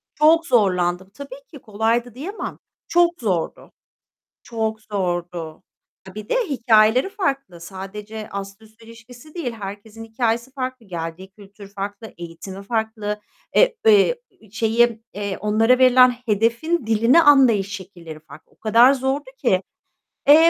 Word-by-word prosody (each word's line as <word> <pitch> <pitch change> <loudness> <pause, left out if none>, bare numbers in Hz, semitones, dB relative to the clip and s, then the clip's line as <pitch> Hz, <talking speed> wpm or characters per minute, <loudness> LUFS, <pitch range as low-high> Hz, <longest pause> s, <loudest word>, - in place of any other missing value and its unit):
Çok 325 +2 +4
zorlandım. 185 -5 +1
Tabii 280 +2 -10
ki 285 - -11
kolaydı 225 +3 -1
diyemem. 370 +11 -6 0.3
Çok 345 0 +4
zordu. 185 -7 -2 0.7
Çok 220 -2 -3
zordu. 175 -5 -4 0.5
Bir 210 0 -8
de - - 0
hikâyeleri 230 - +3
farklı. 275 - -3
Sadece 205 +4 -8
ast 195 +1 -7
üst 220 +1 -20
ilişkisi 235 +6 -15
değil. 295 -9 -3
Herkesin 210 +1 -9
hikâyesi 235 +2 -2
farklı. 255 -3 -5
Geldiği 170 +1 -6
kültür 200 0 -14
farklı. 205 +2 -6
Eğitimi 175 +3 -9
farklı. 215 -1 -3 0.4
Eee, - - +4
eee, 445 +3 +5 0.3
şeyi, 225 +1 +1
eee, 200 -2 -4
onlara 225 +4 +3
verilen 255 -1 +6
hedefin 230 +8 0
dilini 230 +8 +4
anlayış 245 -10 +5
şekilleri 170 -5 -11
farklı. 155 0 -16
O - - -30
kadar 230 +4 +5
zordu 265 +1 -2
ki. 195 -7 +1 0.7
Eee, 290 - +10
220 Hz, 125 wpm, -21 LUFS, 195-255 Hz, 0.7 s, Eee